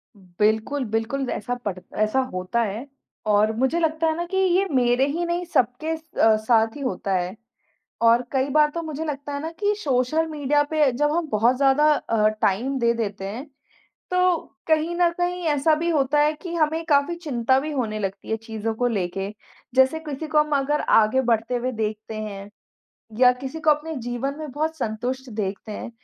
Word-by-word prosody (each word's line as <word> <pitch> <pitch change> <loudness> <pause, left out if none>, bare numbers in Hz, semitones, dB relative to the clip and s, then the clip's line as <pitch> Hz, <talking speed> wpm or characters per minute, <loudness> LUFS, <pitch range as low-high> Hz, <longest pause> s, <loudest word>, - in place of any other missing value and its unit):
उम, 200 - -20 0.2
बिल्कुल, 220 +6 +1
बिल्कुल, 225 +5 -2
ऐसा 245 +4 -3
पड़ 190 -3 -2 0.2
ऐसा 215 +5 +2
होता 185 +6 -1
है 220 +6 -4 0.4
और 210 +1 +4
मुझे 265 +8 +1
लगता 320 0 +1
है 315 - +1
ना 345 - -2
कि 380 +2 -3
ये 380 0 +3
मेरे 250 0 +3
ही 335 +5 -1
नहीं, 345 +1 -2
सबके 300 +1 0
स 315 0 -20
अ, 220 -1 +6
साथ 225 0 +2
ही 290 - -8
होता 195 -5 -2
है। 180 +2 -2 0.7
और 230 +1 +5
कई 265 0 +1
बार 300 +1 +4
तो 335 +2 -4
मुझे 315 -1 -4
लगता 290 -1 -5
है 285 - -3
ना 320 - -4
कि 415 0 +2
सोशल 275 +1 +1
मीडिया 295 -2 +1
पे 310 -1 +1
अ, 265 - +4
जब 295 +5 +1
हम 340 -1 0
बहुत 230 +4 +3
ज़्यादा 285 +3 +4
अ, 220 -6 +1
टाइम 245 +8 +1
दे 235 -1 +3
देते 205 -4 -3
हैं, 240 +9 -6 0.7
तो 365 -1 +3 0.3
कहीं 320 +2 +2
न 345 -1 +4
कहीं 355 0 -1
ऐसा 295 +1 +3
भी 335 +2 -1
होता 295 -2 +2
है 300 +1 +3
कि 350 -2 -6
हमें 320 +1 +1
काफ़ी 295 +1 +2
चिंता 265 -6 +1
भी 305 +2 -4
होने 220 -6 -2
लगती 195 -1 -5
है 220 - +1
चीज़ों 225 0 -4
को 245 +2 +1
लेके। 195 -2 -2 0.5
जैसे 265 +4 +4
किसी 305 0 -6
को 305 - 0
हम 300 0 +1
अगर 290 +2 0
आगे 225 +4 +4
बढ़ते 230 +2 +1
हुए 250 +1 -1
देखते 220 -1 -4
हैं, 205 -2 -6 0.7
या 250 -1 +7
किसी 270 +4 -5
को 315 - +2
अपने 305 +2 +1
जीवन 245 +4 -3
में 305 -3 -6
बहुत 310 +4 -2
संतुष्ट 250 +3 -3
देखते 210 0 -4
हैं, 210 - -6
265 Hz, 200 wpm, -23 LUFS, 225-310 Hz, 0.7 s, या